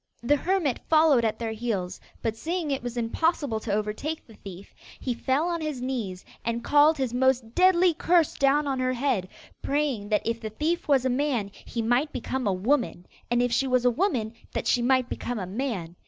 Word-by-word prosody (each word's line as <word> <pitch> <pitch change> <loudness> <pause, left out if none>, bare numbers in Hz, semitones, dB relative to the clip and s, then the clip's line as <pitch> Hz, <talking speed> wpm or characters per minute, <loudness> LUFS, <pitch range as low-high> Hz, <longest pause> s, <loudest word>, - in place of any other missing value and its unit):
The 290 +5 +4
hermit 335 -5 0
followed 310 -6 +5
at 220 -1 0
their 230 -1 -3
heels, 215 -5 -3 0.2
but 225 -1 -1
seeing 325 +4 -3
it 270 - -1
was 245 0 -5
impossible 250 +1 0
to 220 - -5
overtake 215 +10 -2
the 225 - -16
thief, 195 -2 -11 0.3
he 250 - -2
fell 265 +7 0
on 340 -1 -2
his 305 -4 -3
knees 235 -8 -4 0.2
and 235 +1 -2
called 295 +2 +5
his 260 -3 -2
most 250 -2 +1
deadly 365 0 +5
curse 335 0 +2
down 280 +2 +2
on 270 -2 -1
her 255 0 +1
head, 245 -7 0 0.3
praying 275 -8 -1
that 210 - +1
if 230 0 -2
the 220 - -4
thief 310 +10 -2
was 270 -3 +3
a - - +2
man, 250 -6 0
he 230 - -5
might 245 +6 +1
become 255 -1 -3
a - - +3
woman; 200 -1 0 0.2
and 240 +1 +2
if 245 - 0
she 270 +3 +1
was 255 -1 +2
a 245 - +5
woman, 240 - 0 0.2
that - - -2
she 245 - +2
might 255 0 +2
become 245 -1 -4
a 190 - -3
man. 190 -5 -4
250 Hz, 205 wpm, -26 LUFS, 225-290 Hz, 0.3 s, followed